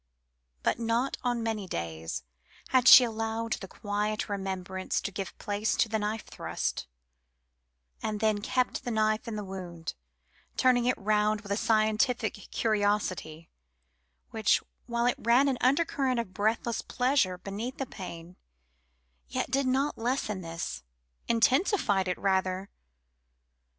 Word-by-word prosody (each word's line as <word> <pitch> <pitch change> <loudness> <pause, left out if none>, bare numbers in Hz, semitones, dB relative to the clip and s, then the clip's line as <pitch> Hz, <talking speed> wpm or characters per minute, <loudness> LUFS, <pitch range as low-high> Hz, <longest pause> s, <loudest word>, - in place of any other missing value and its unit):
But - - +1
not 235 +3 0
on 240 -2 0
many 220 -4 -2
days 80 - -4 0.5
had 255 -1 +4
she 255 - +11
allowed 225 0 -2
the 190 - -5
quiet 210 +2 -2
remembrance 190 -1 -2
to - - -4
give 195 0 -5
place 205 +1 -1
to - - +3
the 220 0 -1
knife 215 +1 -2
thrust, - - -3 1.1
and 210 -1 -2
then 215 -1 +1
kept 250 +3 0
the - - -3
knife 215 -1 +1
in 230 - -3
the 210 - -3
wound, 180 -4 -6 0.6
turning 250 -2 +4
it 250 - +2
round 210 0 +1
with 205 -2 -9
a - - +3
scientific 220 +2 +2 0.2
curiosity, 205 -7 -1 0.8
which, 220 -2 +3 0.3
while 235 0 0
it 245 - +2
ran 240 +5 +4
an 265 -3 0
undercurrent 270 -2 +2
of 195 -5 -4
breathless 220 +3 0
pleasure 250 -8 +1
beneath 205 +7 -5
the 270 - -2
pain, 180 -5 -9 0.9
yet 65 - -3
did 270 0 +2
not 270 +2 +1
lessen 225 -5 -1
this 165 - -5 0.5
intensified 235 - +3
it, 180 - -1
rather. 190 0 0
215 Hz, 135 wpm, -29 LUFS, 195-240 Hz, 1.1 s, she